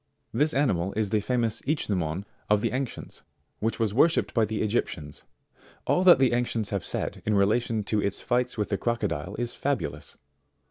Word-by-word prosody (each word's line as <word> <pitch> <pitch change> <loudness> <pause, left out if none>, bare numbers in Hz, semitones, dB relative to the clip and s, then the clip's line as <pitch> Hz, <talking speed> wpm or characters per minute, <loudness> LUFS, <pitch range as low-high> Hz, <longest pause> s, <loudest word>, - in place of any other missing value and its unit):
This 150 +6 +2
animal 100 -10 +1
is 105 -2 -1
the 110 - +3
famous 115 0 -1
Ichneumon 95 - -1 0.2
of 105 -1 +4
the - - 0
ancients, 130 0 -5 0.4
which 110 +2 -1
was 110 -3 +1
worshipped 155 +7 +3
by 115 -2 +3
the 110 +1 -2
Egyptians 85 -9 -2 0.6
All 180 - +2
that 180 - +9
the 130 -2 +3
ancients 120 -3 -1
have 100 -3 -1
said - - -4
in 105 - +1
relation 110 +2 +2
to 105 +1 0
its 100 - -1
fights 125 -1 0
with 105 - -1
the 100 - -1
crocodile 105 -7 -2
is 120 0 -3
fabulous. 140 -3 -3
110 Hz, 175 wpm, -27 LUFS, 100-125 Hz, 0.6 s, that